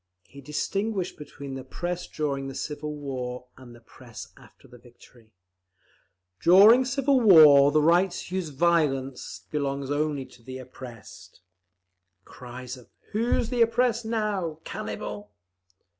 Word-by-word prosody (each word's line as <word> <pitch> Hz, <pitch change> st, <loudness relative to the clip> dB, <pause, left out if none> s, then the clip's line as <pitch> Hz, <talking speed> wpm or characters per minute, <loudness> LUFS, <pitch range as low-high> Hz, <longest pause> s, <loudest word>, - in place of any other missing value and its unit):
He 140 Hz, -, -14 dB
distinguished 195 Hz, -, -3 dB
between 140 Hz, -2 st, -9 dB
the 135 Hz, 0 st, -6 dB
Press 175 Hz, +4 st, -5 dB
during 140 Hz, -3 st, -3 dB
the 135 Hz, -, -7 dB
civil 150 Hz, +1 st, -5 dB
war, 125 Hz, -3 st, -5 dB
and 125 Hz, -2 st, -14 dB
the -, -, -15 dB
Press 120 Hz, -1 st, -12 dB
after -, -, -19 dB
the 125 Hz, -, -16 dB
victory. 120 Hz, -1 st, -20 dB, 1.1 s
"During 210 Hz, +8 st, +7 dB
civil 270 Hz, +1 st, +2 dB
war 150 Hz, -, +8 dB
the 155 Hz, 0 st, +3 dB
right 175 Hz, +4 st, +4 dB
to 180 Hz, +1 st, -7 dB
use 185 Hz, -4 st, -2 dB
violence 140 Hz, -4 st, -1 dB
belongs 140 Hz, -2 st, -2 dB
only 145 Hz, -2 st, -1 dB
to 120 Hz, -, -19 dB
the 130 Hz, +2 st, -8 dB
oppressed…." 125 Hz, -2 st, -12 dB, 0.8 s
(Cries 125 Hz, 0 st, -9 dB
of 125 Hz, -, -17 dB, 0.2 s
"Who's 230 Hz, +2 st, 0 dB
the 245 Hz, -1 st, 0 dB
oppressed 230 Hz, +1 st, +2 dB
now? 210 Hz, -8 st, -2 dB
Cannibal!"). 105 Hz, 0 st, -6 dB
145 Hz, 130 wpm, -26 LUFS, 130-185 Hz, 1.1 s, war